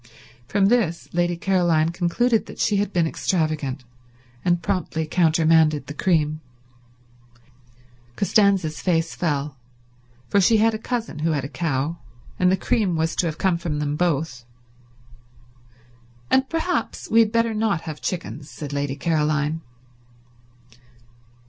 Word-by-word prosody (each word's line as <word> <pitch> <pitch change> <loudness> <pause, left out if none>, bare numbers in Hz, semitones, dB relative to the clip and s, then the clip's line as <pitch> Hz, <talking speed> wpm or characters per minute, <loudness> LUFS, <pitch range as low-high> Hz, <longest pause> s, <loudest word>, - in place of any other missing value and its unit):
From 200 +5 +2
this 195 -7 +1
Lady 175 0 +1
Caroline 170 -4 +2
concluded 195 +7 +1
that - - -10
she 210 - +1
had 205 0 0
been 175 -3 +2
extravagant, 155 -6 -1 0.6
and 175 -1 +2
promptly 160 -3 -1
countermanded 160 -3 +3
the 145 - -7
cream. 155 -2 +1 1.7
Costanza's 195 -6 +2
face 165 -3 0
fell, 145 -4 -2 0.7
for 200 - +3
she 220 +4 +4
had 225 +1 +3
a 215 - -3
cousin 230 -8 -4
who 160 +1 +1
had 140 -3 -2
a - - -3
cow, 155 +1 -2 0.4
and 180 0 +4
the 190 - +2
cream 190 -2 0
was 160 0 0
to 175 - +2
have 155 -1 -4
come 185 -3 +1
from 165 -3 -3
them 150 0 -1
both. 155 -6 -1 1.9
"And 265 0 +3
perhaps 330 -5 -2
we 225 - +5
had 220 -2 +4
better 230 0 +1
not 215 -5 0
have 155 -3 -7
chickens," 160 -4 -5
said 145 -2 -7
Lady 140 -1 -2
Caroline. 155 0 0
170 Hz, 135 wpm, -23 LUFS, 155-195 Hz, 1.9 s, we